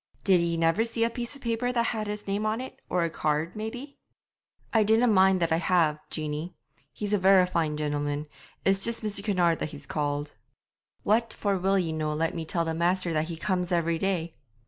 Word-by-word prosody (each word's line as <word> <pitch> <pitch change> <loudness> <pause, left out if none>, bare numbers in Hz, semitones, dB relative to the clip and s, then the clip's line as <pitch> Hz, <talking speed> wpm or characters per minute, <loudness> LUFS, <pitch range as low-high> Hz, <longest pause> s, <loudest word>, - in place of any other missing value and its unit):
'Did 190 -3 +4
ye 170 0 0
never 165 +6 +2
see 230 0 -1
a 230 - +1
piece 240 +3 -4
of 280 - -14
paper 235 +1 0
that 235 -1 +1
had 220 -2 -2
his 210 0 -5
name 200 +2 -1
on 215 +2 0
it, 260 - -8
or 180 -1 +1
a 170 - 0
card, 155 +3 -1
maybe?' 245 +6 -6 0.7
'I 225 - +5
dinna 220 +3 +4
mind 190 -4 +4
that 170 -2 0
I 160 - +3
have, 165 -4 +2
Jeanie. 155 +3 -4 0.4
He's 210 0 -3
a 205 - +3
verra 190 0 +6
fine 160 -4 -1
gentleman; 145 0 -2 0.4
it's 195 0 +4
just 230 0 +2
Mr. 205 -2 -2
Kinnaird 180 -5 +2
that - - -2
he's 145 -1 -8
called.' 145 -1 -2 0.7
'What 225 +2 +2
for 200 -2 -1
will 195 +1 +1
ye 175 -4 0
no 155 -1 -2
let 165 +1 0
me 165 -2 -4
tell 165 +1 -1
the 165 - -1
master 175 +1 +1
that 155 0 +1
he 165 -1 -5
comes 180 +1 -1
every 170 -1 +1
day?' 175 -4 -1
180 Hz, 215 wpm, -27 LUFS, 160-215 Hz, 0.7 s, verra